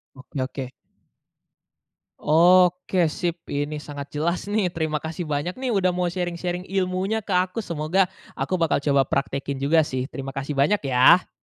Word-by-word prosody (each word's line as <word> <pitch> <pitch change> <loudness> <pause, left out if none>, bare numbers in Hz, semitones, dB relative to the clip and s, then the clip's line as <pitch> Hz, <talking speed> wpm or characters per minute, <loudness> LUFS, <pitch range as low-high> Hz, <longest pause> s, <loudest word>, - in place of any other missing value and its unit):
Oke 130 +1 -6
oke. 130 -1 -6 1.5
Oke 180 +2 +4
sip, 170 +2 -3
ini 145 +1 -3
sangat 145 -1 -8
jelas 170 +4 -1
nih, 210 -3 +2
terima 160 -3 -2
kasih 160 +3 -5
banyak 150 +4 -2
nih 260 -1 -2
udah 195 -4 +2
mau 180 0 0
sharing-sharing 180 0 -3
ilmunya 190 +3 -1
ke 200 - -7
aku, 185 +5 0
semoga 170 +3 +1 0.3
aku 185 - -1
bakal 165 -1 +2
coba 140 -2 +3
praktekin 140 0 -2
juga 150 +4 +4
sih, 130 -3 -3
terima 135 -1 -6
kasih 135 +2 -4
banyak 150 +10 +3
ya. 130 +7 +5
170 Hz, 150 wpm, -24 LUFS, 145-185 Hz, 1.5 s, ya